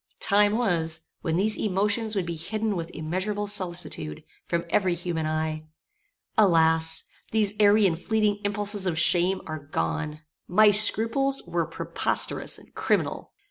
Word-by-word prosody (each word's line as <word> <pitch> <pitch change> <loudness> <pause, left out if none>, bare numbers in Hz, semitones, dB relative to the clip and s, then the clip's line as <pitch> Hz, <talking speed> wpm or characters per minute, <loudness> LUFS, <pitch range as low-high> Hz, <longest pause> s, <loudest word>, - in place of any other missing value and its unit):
Time 205 +1 +2
was, 170 -9 0 0.2
when 160 - -2
these 210 +4 +3
emotions 210 +2 +1
would 190 -3 -1
be 170 -1 -4
hidden 210 +6 -3
with 165 -1 -5
immeasurable 185 +6 -3
solicitude, 180 - -2 0.2
from 170 0 -2
every 185 0 +1
human 170 -2 -3
eye. 155 0 -3 0.7
Alas! 160 -4 +3 0.3
these 215 -2 +2
airy 210 0 +5
and 170 -3 +1
fleeting 215 -2 0
impulses 205 -1 +1
of 165 -3 -1
shame 175 +3 +3
are 155 -1 -6
gone. 150 - -4 0.3
My 210 +3 +5
scruples 230 +6 +4
were 170 -2 -2
preposterous 165 - -1
and - - -19
criminal. - - -2
185 Hz, 140 wpm, -25 LUFS, 160-210 Hz, 0.7 s, airy